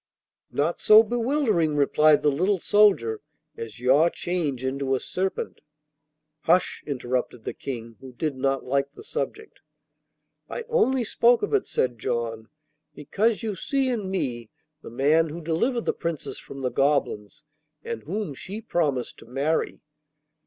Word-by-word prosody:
'Not 155 +4 -1
so 215 +1 +8
bewildering,' 230 - +1
replied 150 +1 +4
the 150 - +4
little 185 +8 +1
soldier, 190 - +3 0.3
'as 115 0 -8
your 135 +7 +4
change 155 -9 -2
into 135 0 0
a - - -1
serpent.' 190 +6 -3 0.8
'Hush!' 175 +3 +2
interrupted 125 -3 -2
the - - -4
King, 115 -4 -7
who 130 -1 -11
did 145 +3 -3
not 135 0 0
like 140 +2 0
the - - -12
subject. 440 0 -5 0.9
'I - - -4
only 265 - +2
spoke 235 - +3
of 415 - -2
it,' 415 - +2
said 125 -3 -1
John, 115 0 -3 0.5
'because 215 - 0
you 220 -2 -1
see 265 +8 0
in 215 -6 -2
me 120 - -3 0.3
the - - -9
man 150 +7 +3
who 160 +3 -6
delivered 175 - 0
the - - +1
Princess 165 -4 -4
from 135 - -9
the 125 -1 -1
goblins 135 -8 0 0.4
and 110 - -5
whom 190 - -4
she 195 +10 -7
promised 155 - -1
to - - -15
marry. 140 +6 -1
150 Hz, 145 wpm, -25 LUFS, 130-205 Hz, 0.9 s, so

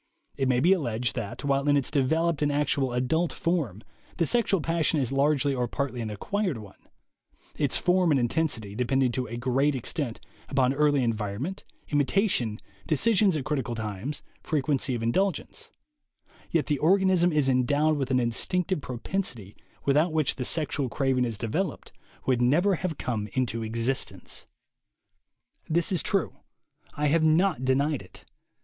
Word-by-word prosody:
It 135 - 0
may 125 -1 +2
be 175 +8 +5
alleged 120 - -1
that, 105 +6 -5
while 140 0 +1
in 145 0 +4
its 140 - -1
developed 160 +3 +1
and 145 -1 +2
actual 140 -2 0
adult 130 +8 0
form, 140 - -2 0.3
the 165 - +2
sexual 225 -2 +2
passion 165 0 +1
is 130 -2 0
largely 140 0 +2
or 125 -2 -1
partly 125 0 -3
an 110 - -3
acquired 185 - -2
one 105 -3 -14 0.7
(its 145 -3 0
form 180 0 +2
and 145 -3 +3
intensity 120 -5 -1
depending 125 +2 +1
to 125 +1 -2
a 115 - -6
great 135 +4 +1
extent 130 -1 -2 0.3
upon 135 -1 +2
early 145 -1 +2
environment, 115 - -3 0.3
imitation, 145 - +1 0.3
decisions 190 +2 +3
at 135 - -4
critical 130 -6 -2
times, 110 +5 -5 0.2
frequency 140 -3 0
of 115 - -4
indulgence), 190 +12 -1 0.8
yet 165 -3 +1
the 145 -2 0
organism 185 0 +3
is 150 -3 +2
endowed 145 +4 +2
with 135 -3 -2
an 130 -1 +2
instinctive 170 +9 0
propensity 120 - -4 0.3
without 150 +5 +3
which 155 -3 +1
the 125 - -2
sexual 145 -3 0
craving 130 -1 +1
as 115 -3 -3
developed 150 - -3 0.3
would 125 -2 +2
never 165 +11 +3
have 170 -3 -3
come 110 -4 -3
into 115 -3 -1
existence. 115 +4 -3 1.2
This 170 +3 +1
is 180 -5 +1
true. - - -1 0.6
I 150 - -1
have 160 +2 +3
not 160 -2 +3
denied 140 +2 +1
it. 90 - -13
140 Hz, 155 wpm, -27 LUFS, 125-160 Hz, 1.2 s, be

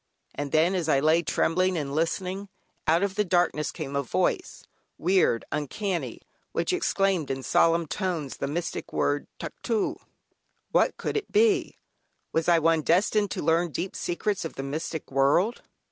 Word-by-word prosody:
And 145 -1 -4
then, 160 +4 +3
as 175 -4 -1
I 140 - +4
lay 155 +4 +4
trembling 185 +2 +1
and 140 -3 -3
listening, 185 +5 -2 0.4
out 165 +4 +4
of 200 -1 0 0.2
darkness 175 -4 +2
came 140 -4 -6
a 140 - +2
Voice, 130 - -1 0.3
weird, 180 -10 +2
uncanny, 175 +5 -3 0.3
which - - 0
exclaimed 195 - +1
in 135 0 -3
solemn 165 +4 +3
tones 160 -4 -3
the - - -2
mystic 165 +4 -4
word 145 0 0
"Tuctoo." 225 -3 -2 0.7
What - - +2
could - - -2
it 430 - -4
be? 415 -5 +3 0.6
Was 160 +1 +1
I 170 - +6
one 165 0 +3
destined 205 +6 +2
to - - -4
learn 165 +3 +2
deep 180 +5 -4
secrets 195 +3 -2
of 165 - -6
the 135 - -4
mystic 155 +3 -4
world? 145 - +2
170 Hz, 155 wpm, -27 LUFS, 150-190 Hz, 0.7 s, I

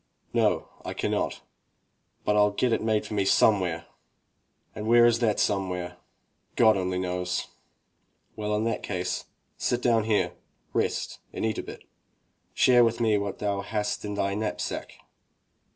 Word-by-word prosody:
"No, - - +2 0.2
I - - -5
cannot, - - -1 0.8
but 105 - +3
Fll 105 -1 +3
get 125 -2 +2
it - - +1
made 110 -1 +1
for - - -6
me 100 -2 +1
somewhere." 95 -4 +3 0.9
"And 105 0 -5
where 120 +1 +7
is 120 -1 +4
that 110 -4 +1
somewhere?" 90 -3 -1 0.6
"God 110 -2 +6
only 90 -1 -1
knows." 90 -1 -2 0.9
"Well, 105 0 -1
in 105 - 0
that 115 -1 -1
case, 90 -2 -3 0.3
sit 120 - 0
down 115 -3 +3
here, 100 -5 +1 0.4
rest - - -1
and - - -3
eat 110 - -1
a - - -1
bit. - - -10 0.7
Share 125 -1 +6
with 115 0 +1
me 110 -3 +3
what 100 -1 -4
thou 100 -1 -1
hast 105 0 -2
in 105 -1 -4
thy 100 -1 0
knapsack." 105 +1 -3
105 Hz, 150 wpm, -27 LUFS, 95-110 Hz, 0.9 s, where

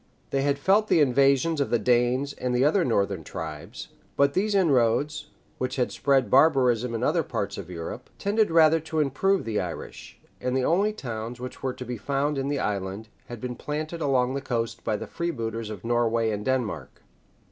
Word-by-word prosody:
They 135 - +1
had 140 0 +1
felt 200 +8 +3
the 170 - +4
invasions 140 +3 +3
of 140 - 0
the 120 - +3
Danes 125 +4 +1
and 125 -1 -2
the 125 +2 +3
other 175 +5 +3
northern 100 - 0
tribes; 75 -1 -7 0.3
but 140 0 +3
these 205 +4 +1
inroads, 145 - +2 0.3
which 130 0 -2
had 125 -2 0
spread 135 -2 +2
barbarism 125 -5 +4
in 115 - -2
other - - +2
parts - - -3
of - - -8
Europe, 85 -2 -7
tended 210 +2 +1
rather 165 -1 +5
to 160 0 -3
improve 165 +7 +1
the 110 -2 -1
Irish; - - -8 0.2
and 125 +1 0
the 130 - +1
only 200 +6 +2
towns 120 - -6
which 125 0 -8
were 130 -1 -2
to 125 - -8
be 125 0 -4
found 140 +5 -1
in 135 - -2
the 145 0 -1
island, 100 0 -3 0.2
had 120 -2 -8
been 125 +1 -5
planted 155 +5 -4
along 130 -3 +2
the 140 - -2
coast 115 -3 -3
by 110 -2 0
the - - -6
freebooters 115 -10 -4
of 105 -3 -8
Norway 115 -1 +1
and 105 0 -4
Denmark. 130 -4 -2
130 Hz, 190 wpm, -26 LUFS, 115-150 Hz, 0.3 s, rather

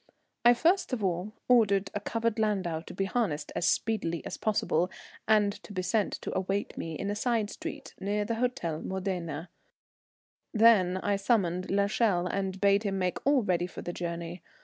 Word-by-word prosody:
I 240 0 +7
first 340 +3 +2
of 225 -5 -1
all 185 +2 -1 0.2
ordered 200 -5 +4
a 205 - -1
covered 230 +1 -1
landau 195 -7 0
to 165 - -10
be 195 - 0
harnessed 190 -9 -1
as 175 - +1
speedily 185 -6 0
as - - -4
possible, 185 -5 +1 0.4
and 210 -2 +4
to - - -12
be 185 -2 -2
sent 210 +2 +1
to - - -4
await 195 +2 -1
me 165 -1 -5
in 200 +5 -2
a - - -2
side 225 -2 0
street 315 -3 -7
near 205 +1 -1
the 230 - -1
Hôtel 225 -10 -2
Modena; 180 -4 -3 1.0
then 210 -5 +5
I 200 +1 0
summoned 190 -4 +1
l'Echelle 200 -2 +2
and 190 +1 -2
bade 200 0 +4
him 200 -3 -1
make 185 -1 -1
all 280 -4 +4
ready 180 -2 +1
for - - -9
the 175 - -4
journey. 170 0 -5
200 Hz, 175 wpm, -29 LUFS, 180-220 Hz, 1.0 s, I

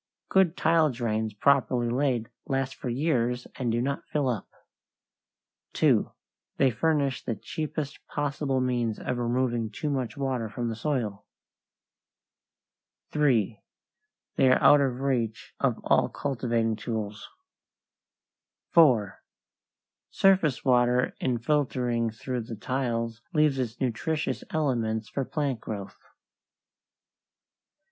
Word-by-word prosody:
Good 190 -3 +3
tile 160 -1 +4
drains 110 -4 -2
properly 130 0 +2
laid 125 -2 0 0.2
last 135 -1 -1
for 125 - -6
years 125 -2 0
and 125 -3 -1
do 120 +1 0
not 140 +1 -3
fill 145 -3 0
up. 115 -6 -3 1.3
2. - - +3 0.5
They 135 -2 +4
furnish 140 +2 0
the 115 - -2
cheapest 155 +5 -4
possible 145 -2 -1
means 120 -3 0
of 125 - -3
removing 120 -1 0
too 145 +8 -3
much 130 -3 -2
water 130 -5 -1
from 120 +2 -3
the 115 - -3
soil. 115 -6 -2 1.8
3. 120 -8 +2 0.8
They 130 - +5
are 130 - +5
out 145 - +7
of 130 -2 -1
reach 120 -6 -1
of - - +1
all - - +3
cultivating 115 -5 -1
tools. 105 -2 -5 1.4
4. 125 - +4 0.9
Surface 185 -10 +3
water 125 -1 +3
in 125 -2 0
filtering 125 -3 0
through 120 +3 -4
the 115 0 -7
tiles 115 -1 -2
leaves 150 -4 +3
its 120 -2 -3
nutritious 150 +6 -1
elements 115 -8 -1
for 135 - -2
plant 140 -3 -2
growth. 100 -3 -6
125 Hz, 115 wpm, -27 LUFS, 115-140 Hz, 1.8 s, out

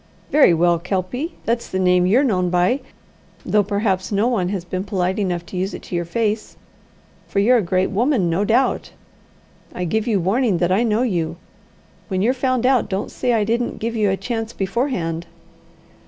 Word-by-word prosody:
"Very 290 -8 +6
well, 170 0 +3
Kelpie 195 - -3
that's 235 +1 -1
the 185 - -2
name 180 -1 +3
you're 240 +9 +4
known 185 -9 +1
by, 180 +9 +2 0.7
though 210 - +3
perhaps 200 -2 -1
no 205 +3 +2
one 200 -8 0
has 190 -3 -3
been 185 +1 -3
polite 190 -1 -1
enough 175 -4 -1
to 185 - -7
use 190 +2 -2
it - - -10
to - - -6
your 175 0 -1
face, 215 +4 -2 0.7
for - - -6
you're 235 +6 +5
a - - +1
great 185 0 0
woman, 230 - +1
no 170 +4 +1
doubt 240 +5 +1 0.8
I 180 - -2
give 220 +6 -1
you 215 -4 +2
warning 200 +3 +1
that 175 +1 +1
I 195 +4 +3
know 230 0 +1
you. 170 -8 -1 0.7
When 190 -2 -1
you're 245 +4 +3
found 255 -2 0
out, 255 -5 +3
don't 190 0 -3
say 250 - -1
I 220 -2 +2
didn't 235 +3 -1
give 230 +1 -3
you 210 -2 +2
a 190 - 0
chance 225 +2 -4
beforehand." 190 - -2
200 Hz, 190 wpm, -21 LUFS, 180-235 Hz, 0.8 s, Very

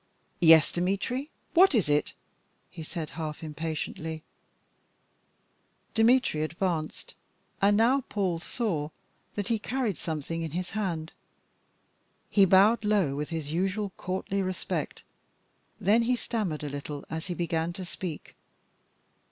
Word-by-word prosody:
"Yes, 160 -3 +7
Dmitry, 200 - -1 0.2
what 365 -3 +6
is 210 -9 +3
it?" 150 0 +1 0.6
he - - -8
said 160 -1 -5
half 155 +1 -5
impatiently. 160 0 -4 1.7
Dmitry 225 -7 +4
advanced, 160 0 -2 0.5
and 205 +1 +5
now 250 +5 +4
Paul 185 -5 0
saw 170 -6 -2 0.5
that 205 -2 -2
he 230 -2 +1
carried 245 -4 -1
something 160 +1 -3
in 160 -2 -4
his 180 -1 -4
hand. 175 -7 -2 1.2
He 200 -2 +6
bowed 200 +5 +5
low 200 -10 +2
with 150 +1 -3
his 160 -3 -4
usual 195 +3 0
courtly 190 +1 -2
respect. 185 -1 -3 0.8
Then 210 +3 +4
he 245 +2 +2
stammered 205 -11 -2
a 145 - -3
little 145 0 -6
as 160 +1 -4
he 175 - -3
began 165 -1 -1
to 185 0 -6
speak. 175 -3 -6
180 Hz, 125 wpm, -28 LUFS, 160-210 Hz, 1.7 s, Yes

